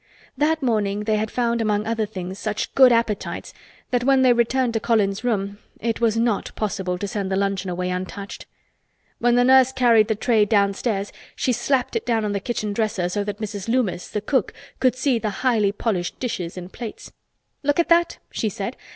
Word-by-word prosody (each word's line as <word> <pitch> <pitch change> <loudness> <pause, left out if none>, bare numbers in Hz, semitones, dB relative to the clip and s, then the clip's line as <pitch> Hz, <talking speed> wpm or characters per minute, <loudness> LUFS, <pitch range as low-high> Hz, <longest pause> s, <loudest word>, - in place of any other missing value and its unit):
That 305 +2 +1
morning 210 -4 0
they 215 0 +1
had 215 +1 -1
found 235 -1 0
among 210 -1 0
other 225 -1 -1
things 190 -1 -6
such 215 -1 -3
good 260 -2 +7
appetites 230 -3 -1 0.4
that 245 -1 +1
when 265 0 +4
they 250 -1 +6
returned 240 +1 +1
to 225 - +1
Colin's 210 -2 +1
room 205 -4 -1 0.2
it 230 +1 -2
was 225 -1 +2
not 230 -3 0
possible 190 -4 -2
to 205 - -4
send 195 -1 -3
the - - +1
luncheon 195 -1 -1
away 180 +1 -2
untouched. 185 +2 -6 0.7
When 240 0 +3
the 245 - +5
nurse 260 0 +6
carried 235 -5 +4
the 220 - 0
tray 225 0 +3
downstairs 200 0 0 0.2
she 255 - 0
slapped 250 - 0
it 455 - 0
down 225 -3 +1
on 210 - -1
the 200 - -1
kitchen 210 -1 -3
dresser 200 -5 -1
so 205 +3 -1
that 205 -1 -4
Mrs. 205 -2 -5
Loomis, 225 -7 0
the 210 - -3
cook, 250 0 0 0.3
could 255 -1 +3
see 255 -2 +1
the 215 -1 -2 0.2
highly 220 -5 +3
polished 200 -4 -2
dishes 185 -9 -4
and 180 +1 -8
plates. 230 -3 -8 0.5
"Look 290 +2 +1
at 340 - +2
that!" 340 0 +3
she 220 - -1
said. 200 +5 -5
220 Hz, 195 wpm, -23 LUFS, 200-245 Hz, 0.7 s, good